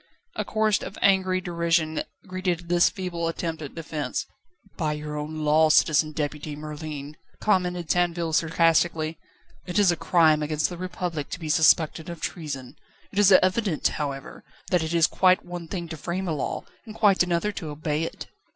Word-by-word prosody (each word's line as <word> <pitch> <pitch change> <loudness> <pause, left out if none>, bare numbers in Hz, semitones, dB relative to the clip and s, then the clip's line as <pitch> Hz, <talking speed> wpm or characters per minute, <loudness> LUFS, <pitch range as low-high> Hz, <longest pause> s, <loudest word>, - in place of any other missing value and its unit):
A - - -1
chorus 215 -2 +1
of - - -7
angry 190 -1 +3
derision 170 -3 0 0.2
greeted 180 -2 -3
this 175 0 +5
feeble 175 -3 -3
attempt 165 -1 -3
at 145 - -8
defence. 150 -4 -3 0.5
"By 155 -4 -1
your 150 0 -5
own 155 +1 -4
law, 155 +1 +5
Citizen 155 0 +4
Deputy 150 0 -3
Merlin," 150 -1 -7 0.2
commented 180 -4 0
Tinville 170 -2 0
sarcastically, 165 0 +2 0.5
"it 180 +2 -3
is 200 -4 +5
a - - 0
crime 160 -2 +3
against 155 0 0
the 175 - -7
Republic 180 -4 -4
to - - -5
be 160 -3 -5
suspected 160 +1 +3
of 170 -1 -7
treason. 140 -7 -5 0.3
It 200 - -2
is 205 -1 +6
evident, 185 -2 +3
however, 140 -2 -5 0.3
that 180 -2 +3
it 160 +1 -2
is 165 -1 +5
quite 185 +3 +3
one 175 -1 -7
thing 175 -1 -4
to 160 - -6
frame 180 +5 -3
a 165 - 0
law 145 - -3 0.2
and 215 - -9
quite 205 -4 +4
another 180 +3 +1
to 165 -6 -6
obey 150 0 -2
it." 165 - -5
165 Hz, 170 wpm, -25 LUFS, 155-180 Hz, 0.5 s, is